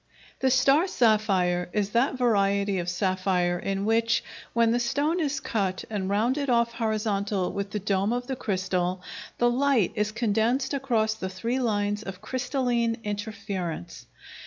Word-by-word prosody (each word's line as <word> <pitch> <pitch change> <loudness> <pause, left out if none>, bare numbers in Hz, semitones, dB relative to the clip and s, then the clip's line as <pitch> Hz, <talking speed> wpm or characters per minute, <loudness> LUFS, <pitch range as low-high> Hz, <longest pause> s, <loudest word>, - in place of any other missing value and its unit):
The 265 - +2
star 275 +7 +4
sapphire 195 - +2
is 205 -1 0
that 255 +4 +2
variety 200 -4 +2
of 175 0 -2
sapphire 185 -1 0
in 195 0 -2
which, 230 +1 +2 0.3
when 230 -1 +3
the 240 - +2
stone 295 +8 0
is 295 -3 0
cut 195 -4 -2
and 195 -3 -2
rounded 250 +8 +1
off 235 -1 +2
horizontal 210 -4 -1
with 200 0 -3
the 210 - -3
dome 200 +1 0
of 245 +1 -1
the 265 - -3
crystal, 185 -4 -1 0.3
the 240 - +3
light 255 -6 +2
is 210 0 -1
condensed 235 +4 0
across 235 -6 +1
the 190 -3 -5
three 230 +7 -2
lines 205 -3 0
of 195 -4 -7
crystalline 245 0 -1
interference. 205 - -5
215 Hz, 150 wpm, -26 LUFS, 195-240 Hz, 0.3 s, star